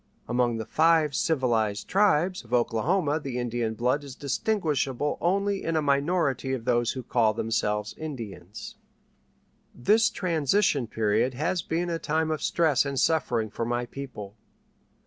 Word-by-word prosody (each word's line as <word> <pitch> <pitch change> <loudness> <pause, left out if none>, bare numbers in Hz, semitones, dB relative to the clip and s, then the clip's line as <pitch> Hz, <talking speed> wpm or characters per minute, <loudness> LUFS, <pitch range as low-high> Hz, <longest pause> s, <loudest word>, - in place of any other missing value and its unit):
Among 120 -1 +1
the 110 - -4
"Five 160 -2 +3
Civilized 115 -10 0
Tribes" 185 -3 +2
of 115 +1 -11
Oklahoma 145 - +1
the 135 -4 -5
Indian 120 -2 -2
blood 125 +5 0
is 135 -2 -9
distinguishable 145 - -1
only 195 +3 0
in 165 - -1
a 155 - +2
minority 140 -2 +1
of 120 -3 -4
those 120 -2 +1
who 130 - -6
call 115 -3 +2
themselves 105 -2 -1
"Indians." 110 - -7 1.0
This 210 - +3
transition 165 - +1
period 110 +3 0
has 160 +6 -1
been 170 +1 -2
a 165 - -2
time 160 +1 0
of 155 - -2
stress 160 -5 +2
and 140 -2 -2
suffering 120 -9 +1
for 115 - -3
my 120 +1 -1
people. 120 -6 -8
135 Hz, 145 wpm, -26 LUFS, 120-160 Hz, 1.0 s, Five